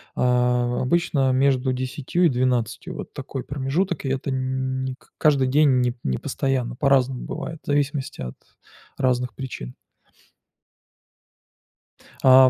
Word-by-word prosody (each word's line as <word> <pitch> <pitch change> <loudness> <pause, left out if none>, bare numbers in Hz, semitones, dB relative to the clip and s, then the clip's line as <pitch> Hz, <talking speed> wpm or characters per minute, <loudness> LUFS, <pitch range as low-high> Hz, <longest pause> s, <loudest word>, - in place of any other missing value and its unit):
А, 125 -1 +2
обычно 135 -2 +2
между 130 0 +2
10 130 +7 0
и - - +6
12, 125 -3 0
вот - - -7
такой 135 -1 -5
промежуток, 145 +7 -1
и - - 0
это 135 +1 -1
нь 130 0 -1
не 130 -1 -3
к - - -27
каждый 140 -4 +4
день, 130 -3 +3
не 65 -1 0
постоянно, 125 - -1
по-разному 130 -1 +2
бывает, 165 -1 -5
в - - -26
зависимости 145 -1 -1
от 60 0 -5 0.6
разных 125 -3 0
причин. 130 -1 -6 2.5
А 130 -1 +8
130 Hz, 125 wpm, -24 LUFS, 125-140 Hz, 2.5 s, А